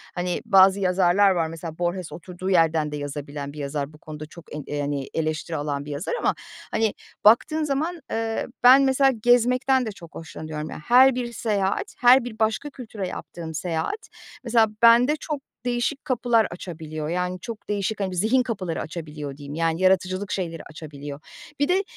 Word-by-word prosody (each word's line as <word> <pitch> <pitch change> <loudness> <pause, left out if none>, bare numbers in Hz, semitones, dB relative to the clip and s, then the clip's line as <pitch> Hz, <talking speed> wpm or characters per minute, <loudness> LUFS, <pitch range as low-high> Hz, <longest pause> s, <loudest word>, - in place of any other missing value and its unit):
hani, 180 0 -2
bazı 195 -2 +6
yazarlar 190 +1 +4
var, 170 -3 +1
mesela 165 0 -7
Borges, 175 0 -2
oturduğu 180 +2 -6
yerden 165 -4 +3
de - - -4
yazabilen 145 0 -6
bir - - -12
yazar, 145 +1 -3
bu - - -14
konuda 155 -1 -8
çok 160 -1 -12
en 150 - -5
eee, 145 - -4
yani 145 -1 -2
eleştiri 155 0 -2
alan 145 -1 -3
bir 150 - -7
yazar 145 +6 -3
ama, - - +1 0.4
hani, 220 -1 +1 0.3
baktığın 310 +9 +5
zaman, 305 +4 -1
eee, 225 0 -2 0.2
ben, 255 +3 +9
mesela, 270 0 +4
gezmekten 250 +2 +3
de 220 - -3
çok 170 -5 -14
hoşlanıyorum. 155 -1 -6
Ya, - - -7
her 260 +2 +6
bir 240 -1 -3
seyahat, 205 -3 -1
her 250 +1 +6
bir 230 -3 -8
başka 220 +6 0
kültüre 220 -8 -6
yaptığım 165 -2 -7
seyahat, 165 - -3 0.3
mesela, 230 -2 +4
bende 235 +5 +6
çok 300 -1 -5 0.2
değişik 245 +4 -1
kapılar 240 -4 +2
açabiliyor. 155 -3 -6
Yani, 180 +1 -2
çok 225 +3 -8
değişik, 205 +1 -1
hani, 195 -2 -1
bir - - -5
zihin 225 +8 +3
kapıları 190 -8 -3
açabiliyor 150 -4 -7
diyeyim. 145 0 -8
Yani, 165 +1 0
yaratıcılık 185 +1 +2
şeyleri 165 -4 -3
açabiliyor. 145 -2 -8 0.4
Bir 285 - +2
de, 370 +3 +2
185 Hz, 175 wpm, -24 LUFS, 155-235 Hz, 0.4 s, ben